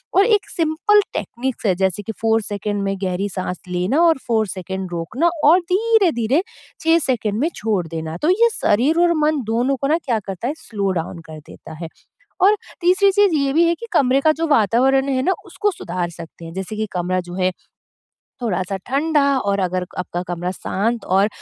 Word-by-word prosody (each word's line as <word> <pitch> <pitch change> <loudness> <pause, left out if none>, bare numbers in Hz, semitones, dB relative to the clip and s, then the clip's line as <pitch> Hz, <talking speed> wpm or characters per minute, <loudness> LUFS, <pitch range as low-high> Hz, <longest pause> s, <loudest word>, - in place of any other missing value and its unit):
और 390 - +6
एक 425 -3 +2
simple 335 +6 +2
techniques 250 0 -4
है 195 - +4
जैसे 190 +2 -1
कि 225 - -4
4 225 0 +2
सेकंड 205 0 -3
में 195 0 -1
गहरी 190 +2 -1
साँस 185 -2 -4
लेना 180 - +1
और 335 -3 +5
4 220 -3 +1
सेकंड 190 -1 -5
रोकना 245 - 0
और 320 +5 +7
धीरे-धीरे 365 - +2 0.4
6 325 +1 +4
सेकंड 220 -5 -1
में 310 +6 +1
छोड़ 210 -5 -1
देना। 160 0 -5
तो 310 - +2
ये 460 +6 +4
शरीर 270 +11 +2
और 345 -1 +4
मन 305 -1 +2
दोनों 245 +4 +1
को 275 - -1
ना 310 +3 +3
क्या 235 -4 +1
करता 195 +4 -4
है 280 - -1
स्लो 205 -10 -3
डाउन 170 -1 -4
कर 155 -1 -9
देता 150 - -13
है। - - -4 0.5
और 405 +3 +5 0.2
तीसरी 370 +3 +4
चीज़ 405 -3 +3
ये 280 -2 +1
भी 330 +4 +4
है 340 - +2
कि 465 - -9
कमरे 270 -5 +3
का 310 +2 +4
जो 330 - +1
वातावरण 265 +2 +3
है 260 -1 +1
ना 375 - +2
उसको 415 -1 -1
सुधार 185 - -4
सकते 165 0 -11
हैं, 165 - -8
जैसे 190 +3 -5
कि 215 0 -1
कमरा 185 0 -1
जो 175 0 -9
है 185 0 0 0.9
थोड़ा-सा 195 -4 -2
ठंडा 295 +3 +2
और 200 -5 0
अगर 185 -1 -1
आपका 175 -1 -3
कमरा 175 0 -3
शांत 210 +5 -2
और 195 +2 +4
225 Hz, 195 wpm, -20 LUFS, 185-315 Hz, 0.9 s, और